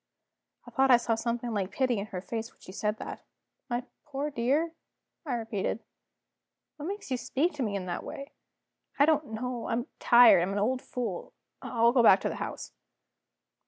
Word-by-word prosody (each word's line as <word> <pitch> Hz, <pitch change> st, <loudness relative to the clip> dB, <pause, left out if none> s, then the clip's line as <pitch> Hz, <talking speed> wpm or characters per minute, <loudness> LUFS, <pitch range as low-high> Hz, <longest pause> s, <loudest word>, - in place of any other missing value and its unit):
I -, -, -12 dB
thought 270 Hz, 0 st, +3 dB
I 245 Hz, -, +9 dB
saw 235 Hz, -1 st, 0 dB
something 235 Hz, +1 st, -2 dB
like 195 Hz, -3 st, -1 dB
pity 255 Hz, -5 st, +1 dB
in 200 Hz, -, -4 dB
her 185 Hz, -4 st, -5 dB
face 225 Hz, +1 st, -4 dB
when -, -, -31 dB
she -, -, -11 dB
said 210 Hz, +2 st, -1 dB
that. -, -, -7 dB, 0.5 s
"My 240 Hz, 0 st, -1 dB, 0.2 s
poor 290 Hz, 0 st, -3 dB
dear?" 280 Hz, +7 st, +1 dB, 0.5 s
I 255 Hz, -, 0 dB
repeated. 220 Hz, -1 st, -2 dB, 0.9 s
"What 300 Hz, +1 st, -6 dB
makes 400 Hz, -6 st, -6 dB
you 255 Hz, -, +1 dB
speak 295 Hz, +7 st, 0 dB
to 295 Hz, -, -5 dB
me 210 Hz, -5 st, -1 dB
in 190 Hz, -2 st, -3 dB
that 175 Hz, -1 st, -4 dB
way?" 275 Hz, +1 st, -8 dB, 0.7 s
"I 285 Hz, -, +6 dB
don't 305 Hz, -1 st, +2 dB
know 240 Hz, +1 st, -4 dB
I'm 235 Hz, +2 st, -1 dB
tired; 240 Hz, -7 st, +7 dB
I'm 185 Hz, +3 st, -1 dB
an -, -, -2 dB
old 250 Hz, +5 st, +1 dB
fool 250 Hz, -2 st, -5 dB, 0.3 s
I'll 235 Hz, -1 st, +3 dB
go 250 Hz, -1 st, +4 dB
back 230 Hz, -, +7 dB
to -, -, 0 dB
the -, -, -5 dB
house." -, -, -5 dB
240 Hz, 190 wpm, -29 LUFS, 220-270 Hz, 0.9 s, I